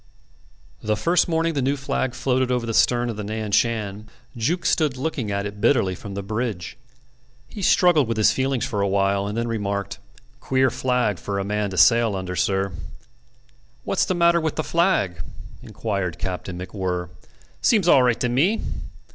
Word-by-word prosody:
The 105 0 -1
first 170 +11 +2
morning 165 0 0
the 140 - -1
new 140 +3 0
flag 130 -1 -2
floated 130 -1 0
over 125 -2 0
the 115 - -3
stern 120 +1 +2
of 110 - -8
the 105 - -4
Nan 110 0 -4
Shan 105 -2 0 0.3
Jukes 155 +10 0
stood 150 -6 +1
looking 130 -5 -3
at 100 0 -2
it 105 0 -7
bitterly 100 -9 +3
from 100 +2 -8
the 100 - -4
bridge. 110 -2 -4 0.7
He 205 - -9
struggled 175 -6 +4
with 115 -1 -2
his 110 - +4
feelings 130 -2 -1
for 105 - -2
a 100 - +1
while, 100 0 +1
and 105 +2 -4
then 115 0 -1
remarked, 100 -3 -3 0.4
"Queer 130 0 +1
flag 125 -7 0
for 100 -1 -4
a 100 - -1
man 105 0 -1
to 95 - -6
sail 115 +3 +5
under, 95 -1 -4
sir." 95 +2 0 1.1
"What's 190 - +1
the 185 - -1
matter 170 0 +4
with 160 -1 -2
the 155 - -1
flag?" 165 - +1 0.4
inquired 100 -6 -3
Captain 90 0 -5
MacWhirr. 90 -1 -4 0.5
"Seems 210 -7 +3
all 140 - +6
right 120 -2 +2
to 125 - +2
me." 155 - +2
115 Hz, 180 wpm, -23 LUFS, 100-130 Hz, 1.1 s, all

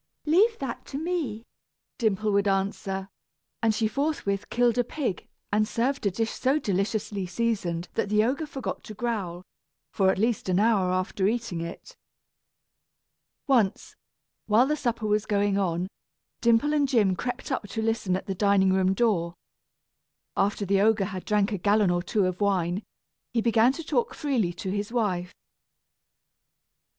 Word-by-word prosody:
"Leave 405 +9 +4
that 265 -4 -5
to 275 - -6
me," 300 -9 -3 0.5
Dimple 215 -2 +1
would 200 0 +2
answer; 195 0 -1 0.5
and 225 -1 +3
she 220 0 +1
forthwith 255 -6 -2
killed 245 0 +2
a - - +4
pig, 245 - -3 0.3
and 215 +1 +3
served 250 0 0
a - - +4
dish 225 +4 -2
so 270 +3 +1
deliciously 200 -3 -1
seasoned 180 -5 -1
that 200 - -1
the 210 +1 +3
ogre 275 +7 -1
forgot 270 -2 -5
to 215 - -8
growl, 195 -6 -3 0.5
for 190 -2 +3
at - - +1
least 220 -1 0
an 180 +1 +3
hour 205 -4 +3
after 185 +1 0
eating 225 -6 -2
it. 170 - -8 1.5
Once, 235 -8 +1 0.5
while 220 +4 +5
the 300 +2 +1
supper 235 -6 -2
was 210 0 +1
going 200 -1 +1
on, 180 -1 0 0.5
Dimple 235 +5 +3
and 290 -2 +3
Jim 210 -8 +3
crept 245 +8 -4
up 255 -5 -2
to 220 +2 -3
listen 220 -5 0
at 190 - -4
the 195 - -2
dining 190 -1 +3
room 190 0 +2
door. 180 -7 +1 1.0
After 200 +1 +1
the 195 +1 +2
ogre 215 -1 +3
had 190 -2 -6
drank 210 0 +2
a 200 - -2
gallon 205 0 +3
or 175 0 +1
two 195 +2 +1
of 185 +2 -2
wine, 190 -2 +1 0.5
he 235 - +2
began 230 +1 +4
to 330 - -6
talk 265 -6 -1
freely 250 -12 0
to 185 +2 -5
his 205 +2 -3
wife. 185 -7 -1
210 Hz, 160 wpm, -26 LUFS, 190-235 Hz, 1.5 s, while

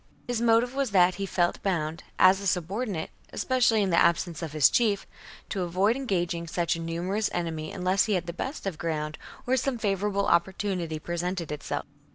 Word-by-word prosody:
His 245 -2 -1
motive 235 +2 +3
was 275 -2 0
that 185 -2 +5
he 195 - -1
felt 175 -2 0
bound, 165 -4 -1
as 190 +1 +6
a 200 - -2
subordinate, 180 +1 -2 0.2
especially 240 -5 +2
in 190 - 0
the 170 - +4
absence 170 -1 +1
of 165 -3 -4
his 150 -3 +6
chief, 210 -5 +1 0.4
to 195 - -2
avoid 185 +6 +2
engaging 175 -9 -1
such 170 +1 0
a - - -6
numerous 175 +6 -1
enemy 160 -3 -3
unless 185 +1 +1
he 215 - 0
had 180 -2 0
the 170 - -5
best 265 - -5
of 195 - -1
the 155 - -19
ground 155 -2 -3 0.3
or 255 - +2
some 260 0 0
favourable 200 -1 0
opportunity 180 -2 0
presented 175 +1 -3
itself. 145 -1 -4
185 Hz, 190 wpm, -27 LUFS, 170-210 Hz, 0.4 s, as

